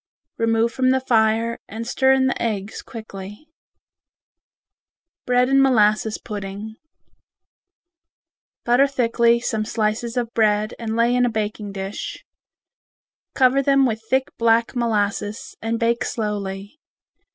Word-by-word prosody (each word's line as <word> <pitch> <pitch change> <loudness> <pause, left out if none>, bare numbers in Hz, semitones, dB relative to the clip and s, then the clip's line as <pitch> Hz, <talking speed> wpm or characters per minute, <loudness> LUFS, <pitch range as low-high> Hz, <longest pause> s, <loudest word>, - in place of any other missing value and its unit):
Remove 230 0 +2
from 255 0 +1
the 260 0 +3
fire 230 -2 +1
and 225 +2 -6
stir 265 +2 +2
in 265 0 +3
the 260 - -1
eggs 210 -3 -3
quickly. 210 +1 -10 1.8
Bread 250 0 +3
and 270 +1 +4
Molasses 215 -4 +3
Pudding 205 +1 -7 1.9
Butter 245 +4 +4
thickly 235 -3 +2
some 220 -2 -2
slices 225 +2 -2
of 240 -1 -2
bread 215 -1 +2
and 225 -1 -3
lay 235 +1 +3
in 250 - +3
a 245 - +3
baking 215 -2 -3
dish. 195 +1 -6 1.1
Cover 260 +1 +4
them 275 0 +3
with 225 -3 -1
thick 265 +2 +1
black 230 +1 +2
molasses 210 -3 -2
and 225 +1 -2
bake 235 0 +1
slowly. 205 +2 -4
230 Hz, 120 wpm, -22 LUFS, 215-245 Hz, 1.9 s, and